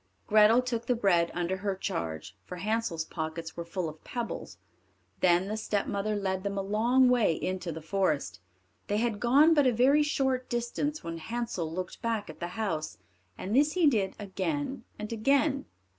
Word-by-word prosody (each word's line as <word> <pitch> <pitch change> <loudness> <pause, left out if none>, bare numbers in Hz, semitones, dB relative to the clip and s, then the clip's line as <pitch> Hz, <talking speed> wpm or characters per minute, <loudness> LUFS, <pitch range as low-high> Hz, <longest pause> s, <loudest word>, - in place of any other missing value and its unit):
Grethel 215 +3 +5
took 235 -2 -3
the 250 - +3
bread 175 -7 +3
under 175 +2 -1
her 200 0 -2
charge, 80 - -4
for 180 - -8
Hansel's 200 -3 -1
pockets 160 0 -5
were 170 - -4
full 170 +1 -3
of 155 0 -9
pebbles. 240 -2 -5 0.6
Then 180 +1 +3
the 215 - -2
stepmother 210 -1 -1
led 190 -2 -1
them 200 0 -3
a 195 - -1
long 235 +6 +3
way 245 -8 +4
into 180 +1 -3
the 160 0 -7
forest. 165 - 0 0.5
They 205 - 0
had 225 -2 0
gone 280 +8 +5
but 290 -4 +4
a - - +5
very 260 +6 +4
short 265 -4 0
distance 240 +5 -2
when 165 0 -5
Hansel 225 -5 -3
looked 180 +2 -5
back 225 -6 -2
at - - -17
the 175 - -3
house, 160 -8 -2 0.4
and 200 +5 -3
this 290 +3 +4
he 360 -3 +3
did 215 -9 +2
again 265 +7 -3
and 210 +2 -5
again. 275 +4 +2
210 Hz, 175 wpm, -29 LUFS, 180-245 Hz, 0.6 s, Grethel